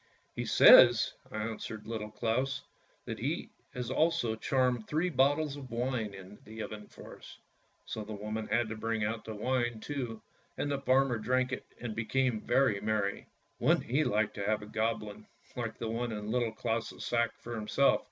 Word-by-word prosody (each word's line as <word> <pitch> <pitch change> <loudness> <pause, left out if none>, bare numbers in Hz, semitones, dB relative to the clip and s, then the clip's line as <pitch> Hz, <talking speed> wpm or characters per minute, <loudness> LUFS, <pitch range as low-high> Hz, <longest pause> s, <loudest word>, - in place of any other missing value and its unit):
" - - -40
He - - -3
says," - - +8 0.2
answered 110 0 -5
Little 110 -1 -4
Claus, 130 +6 -1 0.2
" - - -37
that - - -5
he - - -2 0.2
has 125 -1 -3
also 155 -7 +2
charmed 125 -1 +1
three 165 +4 0
bottles 145 +1 +2
of 135 -3 -9
wine 115 -4 -2
into 95 +1 -12
the 110 0 -7
oven 105 -1 -8
for - - -12
us." - - -12 0.5
So 110 - -5
the 105 0 -6
woman 105 +1 -4
had 120 -1 +1
to 110 - -4
bring 110 0 -1
out 110 +1 -2
the 110 - -6
wine 120 +1 0
too, 120 -4 -5 0.3
and 145 - -1
the 140 -1 -1
farmer 130 -3 +3
drank 130 +3 +1
it - - -5
and 115 -3 -5
became 115 0 0
very 130 -7 +2
merry. 105 -2 -1 0.3
Wouldn't - - +3
he 135 +6 +2
like 105 -5 +1
to 100 - -4
have 105 0 +1
a - - -7
Goblin, 105 -1 -3 0.3
like 115 -3 -4
the 115 - -4
one 115 +1 -2
in 105 0 -4
Little 120 -2 +1
Claus' 115 -1 -3
sack, 115 -2 +1
for 120 - -8
himself? 115 +5 +2
115 Hz, 185 wpm, -31 LUFS, 110-130 Hz, 0.5 s, says